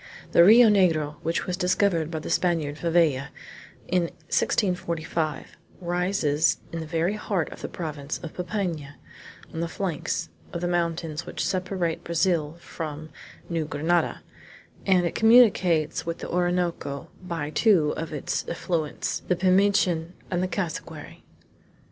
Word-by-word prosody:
The 170 - +7
Rio 225 +5 +8
Negro, 165 -8 +3
which 165 +1 -1
was 180 - -2
discovered 180 -3 +1
by 165 - -4
the 155 - -6
Spaniard 160 -5 +1
Favella 165 -6 +2 0.6
in 180 -1 +2 0.3
1645, 165 -6 -1 0.2
rises 175 -3 +1
in 165 - -4
the 160 - -6
very 165 +4 0
heart 200 -5 -2
of - - -10
the - - -3
province 150 -4 -5
of 165 - -7
Popayan, 175 -6 -3 0.6
on 160 - -4
the 170 - -1
flanks 170 -1 -3 0.2
of 170 - -3
the 175 - 0
mountains 170 -2 -2
which - - -3
separate 180 -3 -1
Brazil 170 -2 0
from 155 -2 -7 0.4
New 165 -2 -1
Grenada, 160 +4 0 0.6
and 185 -2 +4
it 170 - -1
communicates 200 -9 +4
with 165 0 -3
the - - -7
Orinoco 175 -5 -1
by 165 -5 -4
two 160 -3 +3
of 160 0 -5
its 150 -3 -2
affluents, 165 -3 -2
the 180 - +2
Pimichin 185 -2 +2 0.2
and 180 -1 0
the 185 - 0
Cassiquary. 165 -5 -5
170 Hz, 135 wpm, -26 LUFS, 155-180 Hz, 0.6 s, Rio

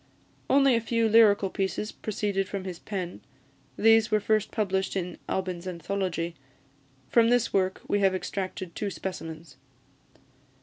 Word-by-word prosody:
Only 275 -1 +5
a 230 - +2
few 230 0 +1
lyrical 210 -3 +5
pieces 195 +2 -2
proceeded 200 -2 -2
from 195 -2 -4
his 180 -2 -6
pen; 185 -4 -5 0.6
these 225 0 +5
were 215 -1 +3
first 215 0 +1
published 195 -3 -1
in 180 -2 -3
"Albyn's 185 -1 -3
Anthology." 175 -1 -3 0.7
From 230 -1 +4
this 245 -1 +2
work 190 -1 0
we 205 - +1
have 195 -1 +3
extracted 185 -1 -4
two 205 - -3
specimens. 165 -6 -7
195 Hz, 135 wpm, -27 LUFS, 185-215 Hz, 0.7 s, Only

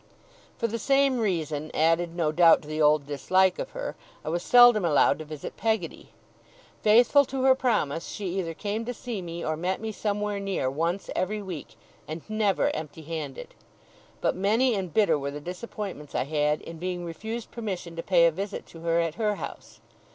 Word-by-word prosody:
For - - -1
the 230 0 -2
same 275 +1 +3
reason, 160 -7 -1
added 165 +2 +2
no 165 -3 +1
doubt 165 0 +6
to - - -13
the 155 +1 -2
old 150 -1 +4
dislike 185 +7 +2
of - - -4
her, - - -4 0.3
I - - -2
was 170 +2 -1
seldom 245 0 +7
allowed 160 -3 +3
to 155 - -6
visit 150 -1 -7
Peggotty. 220 -6 -2 0.7
Faithful 240 +6 +6
to 265 0 -3
her 265 0 +7
promise, 195 - 0
she 205 - -6
either 165 -3 -3
came 210 +5 -3
to 245 +1 -4
see 235 -4 -5
me, 170 -1 -6
or 155 - 0
met 180 +4 -2
me 220 0 -4
somewhere 210 -1 -2
near, 195 -10 -1
once 170 +7 -2
every 210 +3 -1
week, 175 -7 -7 0.3
and 155 +1 -7
never 215 -2 +1
empty 155 +1 -7
handed; 155 -4 -6 0.7
but - - +1
many 220 +7 +2
and 190 -4 -3
bitter 200 -4 +3
were 140 0 -3
the 145 +1 -6
disappointments 180 -2 -7
I - - +1
had, 150 +1 0
in 165 -1 -9
being 180 0 -3
refused 220 +7 -6
permission 190 -7 -5
to 165 - -3
pay 170 -1 +4
a 170 - +5
visit 195 +5 -5
to 165 - -12
her 165 0 +1
at 165 -2 0
her 210 -1 +1
house. - - -9
180 Hz, 190 wpm, -27 LUFS, 160-215 Hz, 0.7 s, seldom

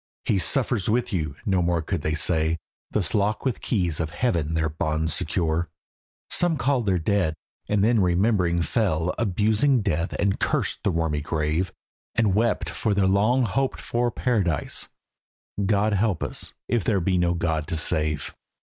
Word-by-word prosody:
"He 100 - +2
suffers 120 -2 +1
with 120 +1 0
you," 75 -6 -2
no 95 -4 +2
more 85 -1 +1
could 90 0 -2
they 75 +1 -1
say, 80 0 +1 0.3
Thus 100 -5 0
lock 105 +2 0
with 130 - -1
keys 90 -8 0
of 80 -2 -1
Heaven 80 -3 -1
their 80 0 +1
bonds 80 0 -1
secure, 85 -1 -1 0.6
Some 175 -3 +2
called 125 -3 0
their 95 -2 +3
dead, 90 -2 0 0.3
and 105 -2 +2
then 115 +1 +3
remembering 90 -2 +2
fell 90 -5 0
Abusing 110 +4 +2
death 85 -3 -1
and 100 -1 0
cursed - - +1
the - - +2
wormy 80 -4 0
grave, 80 +4 -1 0.4
And 110 -5 +2
wept 115 +4 +1
for 105 -3 -1
their 100 -1 +3
long 105 +7 +3
hoped 135 +5 -1
for 120 0 0
Paradise, 105 - 0 0.8
"God 105 +2 +2
help 100 -3 +1
us - - -1
if 120 -4 +1
there 100 -1 +1
be 90 +1 +1
no 85 0 +2
God 80 -2 -1
to 85 - -2
save!" 75 -1 -1
95 Hz, 165 wpm, -25 LUFS, 80-110 Hz, 0.8 s, their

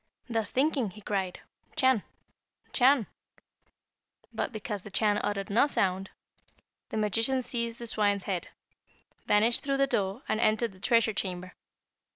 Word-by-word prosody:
Thus 225 -4 0
thinking, 270 -4 +1
he 210 +3 -13
cried, 195 -3 -2 0.3
'Chan, 260 -5 +3 0.7
Chan!' 260 -2 +4 1.3
But - - -2
because 210 -2 -4
the 210 - -8
Chan 205 +1 +2
uttered 200 0 -2
no 235 +7 +4
sound, 190 -7 0 0.8
the - - -4
magician 225 +5 +1
seized 235 -1 -1
the 235 - -6
swine's 205 -3 +2
head, 185 -3 -3 0.8
vanished 220 +3 +4
through 275 -1 -1
the 275 - +4
door, 200 -2 -1
and 215 - 0
entered 220 0 +2
the 190 - -17
treasure 230 +1 +3
chamber. 185 -2 -4
215 Hz, 140 wpm, -29 LUFS, 200-240 Hz, 1.3 s, Chan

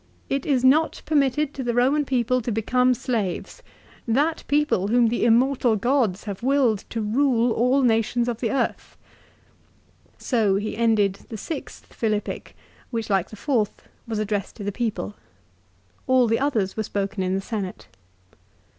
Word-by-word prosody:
" - - -36
It 275 - -4
is 265 -4 +2
not 300 +5 +3
permitted 290 -1 +1
to 265 - -5
the 240 -1 -1
Eoman 270 +4 +2
people 255 -1 +1
to 235 - -3
become 250 +4 +2
slaves; 230 -8 -3 0.5
that 290 +8 +1
people 290 -10 +1
whom 235 +1 +3
the 235 - -1
immortal 245 0 +3
gods 225 -3 +1
have 200 -2 -6
willed 250 -5 +2
to 230 - -3
rule 240 +1 +2
all 250 +4 +2
nations 235 0 +2
of 235 -2 -2
the 230 - -1
earth." 275 - -2
l - - -33
So 220 -6 +1
he 210 +2 -2
ended 210 -4 +2
the 220 - -6
sixth 315 +10 -7
Philippic, 215 -2 -3 0.3
which 225 -3 -3
like 195 -2 +1
the - - -10
fourth 225 -3 -1 0.2
was 225 -1 -3
addressed 210 -2 -2
to 210 - -8
the 205 - -2
people. 210 - -3 0.9
All 260 -1 +4
the 225 0 +1
others 230 -9 0
were 220 - -1
spoken 200 -1 -3
in 185 0 0
the - - 0
Senate. 195 -3 -5
235 Hz, 165 wpm, -24 LUFS, 210-260 Hz, 0.9 s, All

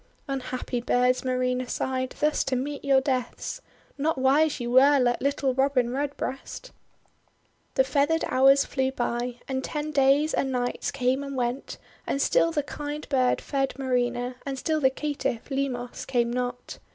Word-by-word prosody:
"Unhappy 255 -2 -3
birds!' 250 +1 +2
Marina 255 -1 -1
sighed, 260 0 -2
"thus 300 +1 +2
to 270 - -1
meet 280 +3 -3
your 270 -1 +4
deaths! 260 -3 -3 0.4
Not 315 +2 +1
wise 280 +3 +3
you 240 0 -3
were, 275 +3 +6
like 245 -1 +1
little 275 -1 +1
Robin 265 -2 +2
Redbreast! 285 - -4 0.5
' - - -41
The 265 - +5
feathered 285 +5 +1
hours 270 +2 +5
flew 265 -1 -1
by, 240 -1 -2
and 265 -1 -2
ten 300 0 -3
days 280 +2 +3
and 265 - 0
nights 245 -1 -1
came 260 +1 0
and 275 -1 -6
went, 250 +1 -2 0.3
and 275 - -1
still 330 - +3
the 295 -3 0
kind 295 +1 -6
bird 255 -3 +2
fed 270 -2 -2
Marina, 250 -1 -1
and 275 -1 -4
still 310 +3 -1
the 265 - +5
caitiff, 275 -4 -3
Limos, 255 -3 -3
came 240 -2 +1
not. 245 0 -4
265 Hz, 160 wpm, -26 LUFS, 250-280 Hz, 0.5 s, were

